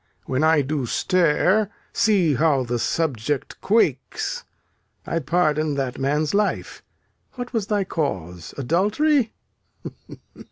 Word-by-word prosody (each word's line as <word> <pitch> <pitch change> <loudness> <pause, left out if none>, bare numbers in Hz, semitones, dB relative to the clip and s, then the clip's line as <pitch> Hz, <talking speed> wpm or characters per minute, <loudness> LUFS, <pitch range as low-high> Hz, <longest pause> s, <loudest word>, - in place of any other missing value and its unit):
When 130 +3 0
I 160 -2 +4
do 135 -2 -2
stare, 185 - +2 0.2
see 195 -8 +3
how 140 -1 +2
the 120 0 -2
subject 145 -2 -2
quakes. 155 - 0 0.6
I 165 - -1
pardon 155 -1 +1
that 135 -1 -3
man's 150 +4 0
life. 205 +1 -1 0.5
What 245 0 -7
was 220 -4 -1
thy 205 -2 +1
cause? 90 - -4
Adultery? 215 - +2
155 Hz, 110 wpm, -23 LUFS, 135-200 Hz, 0.6 s, I